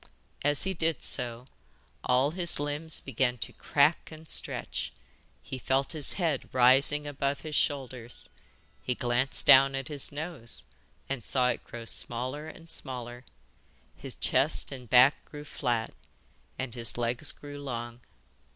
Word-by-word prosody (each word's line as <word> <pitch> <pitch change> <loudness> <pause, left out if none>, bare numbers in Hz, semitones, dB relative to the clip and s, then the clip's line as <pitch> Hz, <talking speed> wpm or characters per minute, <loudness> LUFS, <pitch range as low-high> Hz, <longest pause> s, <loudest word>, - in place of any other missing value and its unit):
As 145 0 +3
he 190 - -1
did 165 -3 0
so, 120 0 +1 0.6
all 130 +3 +2
his 170 -2 +3
limbs 145 +2 -1
began 130 -2 0
to - - -6
crack 150 +3 +2
and 160 0 -12
stretch; - - 0 0.5
he 130 - -7
felt 135 +2 0
his 155 -4 +1
head 165 -8 -1
rising 135 +4 +4
above 140 -1 -2
his 155 -1 -7
shoulders; 130 -5 -2 0.5
he 125 - -1
glanced 125 +1 +2
down 135 +1 +7
at 135 -2 -4
his 145 -3 -2
nose, 145 -6 -7 0.4
and 135 -4 -4
saw 125 +1 +2
it - - -2
grow 120 -1 -9
smaller 130 +7 -2
and 165 +1 -12
smaller; 125 -4 -4 0.7
his - - -7
chest - - +2
and 125 -4 -9
back 125 +4 +6
grew 145 0 -10
flat, 120 -6 -2 0.6
and 130 -3 -4
his 120 -1 0
legs 120 +5 0
grew 145 0 -10
long. 120 -3 -5
135 Hz, 140 wpm, -29 LUFS, 125-145 Hz, 0.7 s, down